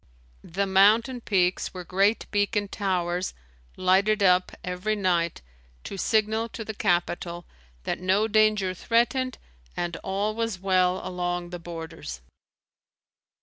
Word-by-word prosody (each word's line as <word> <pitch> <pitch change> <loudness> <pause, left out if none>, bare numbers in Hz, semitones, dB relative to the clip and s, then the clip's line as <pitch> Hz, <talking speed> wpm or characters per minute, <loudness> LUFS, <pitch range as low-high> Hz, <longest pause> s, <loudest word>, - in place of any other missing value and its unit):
The 195 +4 -2
mountain 215 +6 +4
peaks 185 -3 0
were 180 - -5
great 195 +5 +2
beacon 205 0 0
towers 180 -3 -1 0.4
lighted 200 +3 +3
up 180 -1 +4
every 180 +4 -2
night 175 - 0 0.4
to - - -6
signal 220 +3 +1
to 225 -1 -7
the 220 - -5
capital 175 -3 -1 0.4
that - - -2
no 190 +4 +2
danger 215 -3 +3
threatened 240 +6 +1 0.4
and 175 -1 -2
all 200 +4 -2
was 225 -2 -2
well 185 -1 +2
along 175 -1 -3
the 175 - -5
borders. 165 - -7
190 Hz, 120 wpm, -26 LUFS, 180-215 Hz, 0.4 s, mountain